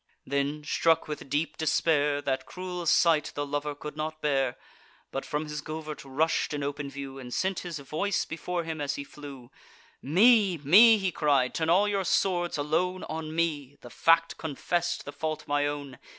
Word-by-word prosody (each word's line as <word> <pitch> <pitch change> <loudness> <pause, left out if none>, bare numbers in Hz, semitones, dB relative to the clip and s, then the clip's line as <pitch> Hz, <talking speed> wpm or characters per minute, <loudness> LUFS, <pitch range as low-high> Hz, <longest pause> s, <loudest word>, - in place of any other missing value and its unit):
Then, 140 +2 -1
struck 165 +2 +2
with 150 -2 -6
deep 150 +4 -1
despair, 150 -2 +1
That 130 -1 -2
cruel 180 0 -5
sight 155 -2 +4
the 145 - -2
lover 145 +1 -3
could 150 +1 -8
not 155 0 -4
bear; 135 -4 0 0.5
But 135 - -4
from 150 +1 -2
his 150 -1 -5
covert 155 -1 -6
rush'd 150 +3 0
in 145 - -3
open 140 0 -3
view, 135 0 -7
And 125 -2 -9
sent 190 +7 -1
his 175 -3 -5
voice 155 +8 -1
before 170 +2 -3
him 160 -2 -5
as 140 -1 -1
he 140 - -5
flew: 140 -4 -11 0.5
"Me! 195 - +4
me!" 205 +11 +7
he 190 -2 -1
cried—"turn 150 +1 +1
all 190 +5 +4
your 200 -1 0
swords 175 -2 +1
alone 180 +6 0
On 155 0 -5
me—the 145 -6 -2
fact 165 +4 +3
confess'd, 160 +3 -2
the 145 - -6
fault 155 -1 -4
my 145 0 +1
own. 145 -3 -6
150 Hz, 170 wpm, -28 LUFS, 145-170 Hz, 0.5 s, me